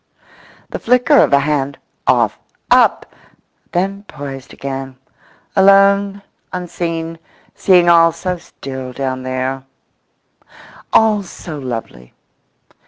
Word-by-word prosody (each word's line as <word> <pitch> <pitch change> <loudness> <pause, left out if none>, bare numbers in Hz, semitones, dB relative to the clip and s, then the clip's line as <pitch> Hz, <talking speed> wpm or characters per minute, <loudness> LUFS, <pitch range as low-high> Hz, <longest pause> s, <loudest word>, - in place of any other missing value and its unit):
The - - -4
flicker 250 +5 +3
of - - +4
a 140 0 +5
hand—off, 140 -1 -1 0.3
up! - - +3 0.6
then 195 +3 -1
poised 135 -2 -8
again. 135 -1 -6 0.6
Alone, 200 0 +4 0.3
unseen; 165 -2 -4 0.3
seeing 180 -2 +4
all 165 -1 +6
so 180 +2 -4
still 130 -5 -8
down 130 -1 -3
there, 130 +1 -3 1.3
all 215 -2 +4
so 170 -4 -8
lovely. 115 - -7
165 Hz, 95 wpm, -17 LUFS, 135-195 Hz, 1.3 s, all